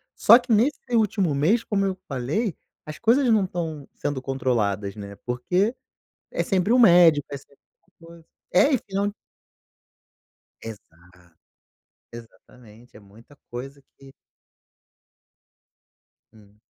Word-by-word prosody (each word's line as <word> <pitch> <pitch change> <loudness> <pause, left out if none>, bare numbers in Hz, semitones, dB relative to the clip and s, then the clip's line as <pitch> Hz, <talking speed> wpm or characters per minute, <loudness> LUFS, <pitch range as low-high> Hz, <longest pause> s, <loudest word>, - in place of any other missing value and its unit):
Só 235 - +7
que 250 0 -17
nesse 235 +6 +2 0.2
último 200 -8 +1
mês, 175 +12 +2
como 200 -3 -1
eu 190 - -1
falei, 150 - -2 0.3
as 155 0 -8
coisas 245 +3 +2
não 220 -3 +3
estão 165 -5 -5
sendo 145 -3 -4
controladas, 110 -7 -2
né, 100 -1 -9
porque 180 - -1 0.6
é - - -2
sempre 195 +3 0
um 250 - +4
médico, 170 - +6
é 140 - -4
sempre 140 +1 -21 0.5
uma 165 - -15
coisa. 170 -1 -16 0.3
É 275 +11 +4
e 260 - +2
final 200 +1 -3 1.5
Exato, 90 -5 -14 0.8
exatamente, 115 0 -16
é - - -12
muita 110 +7 -19
coisa 135 +4 -8 0.2
que 135 -1 -16 2.2
Hum. 105 -1 -22
145 Hz, 120 wpm, -23 LUFS, -, 2.2 s, Só